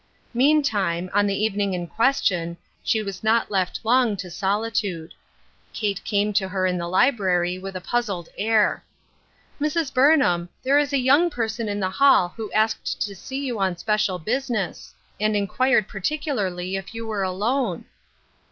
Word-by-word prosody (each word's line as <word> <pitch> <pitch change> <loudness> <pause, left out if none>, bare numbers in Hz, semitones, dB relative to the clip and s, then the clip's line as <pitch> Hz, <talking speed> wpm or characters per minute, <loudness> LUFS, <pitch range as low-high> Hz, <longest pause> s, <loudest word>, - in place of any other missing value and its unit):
Meantime, 220 - +2
on 205 0 +3
the 200 +1 -1
evening 200 -3 0
in 175 -1 -3
question, 175 -7 0 0.3
she 220 -1 +1
was 195 -1 -6
not 220 0 +2
left 190 -3 0
long 235 -2 +3
to 180 -2 -7
solitude. 200 -3 -2 0.6
Kate 205 -3 -2
came 210 0 0
to 195 -1 +1
her 190 0 -1
in 180 -1 +1
the 170 - -3
library 185 -4 +2
with 195 0 -7
a 185 - -4
puzzled 195 -5 -2
air. 215 0 +2 0.4
" - - -30
Mrs. 305 -1 0
Burnham, 255 - +3
there 275 +2 +4
is 290 -1 0
a 280 - +2
young 280 +7 +4
person 230 -5 -3
in 205 0 -2
the 185 -1 -1
hall 190 -8 +4
who 220 -2 -6
asked 220 +1 0
to 205 - -5
see 265 +9 -6
you 240 -5 -3
on 190 -2 0
special 210 -1 0
business, 225 0 -3 0.3
and 215 0 +1
inquired 210 +2 +2
particularly 195 - -2
if 195 +3 -8
you 230 0 -5
were 215 -3 -2
alone." 200 +2 -1
210 Hz, 160 wpm, -23 LUFS, 185-240 Hz, 0.6 s, there